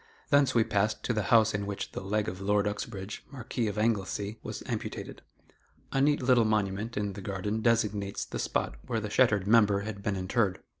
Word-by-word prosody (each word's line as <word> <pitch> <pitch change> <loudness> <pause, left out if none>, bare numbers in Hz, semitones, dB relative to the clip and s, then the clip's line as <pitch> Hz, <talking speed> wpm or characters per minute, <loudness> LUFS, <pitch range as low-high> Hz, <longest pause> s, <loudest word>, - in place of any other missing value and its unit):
Thence 140 -2 +4
we 115 - +5
passed 105 0 0
to 125 - 0
the 110 - 0
house 110 -2 +5
in 100 -1 -2
which 100 -1 -4
the - - -5
leg 105 +2 -1
of 90 +1 -5
Lord 105 +1 +2
Uxbridge 105 -1 -5
(Marquis 125 -4 -3
of 105 0 -3
Anglesey) 105 -1 -1
was - - -6
amputated. - - -5 0.7
A 135 - +1
neat 145 -1 +3
little 125 -2 +5
monument 105 +1 -1
in 105 -1 -1
the 100 - -8
garden 100 +3 -2
designates 105 -4 +1
the - - -6
spot - - -1
where 115 - 0
the 105 -1 -5
shattered 105 -7 +3
member 105 -2 +4
had 100 -1 -6
been 100 0 -1
interred. 95 +1 0
105 Hz, 195 wpm, -29 LUFS, 100-115 Hz, 0.7 s, we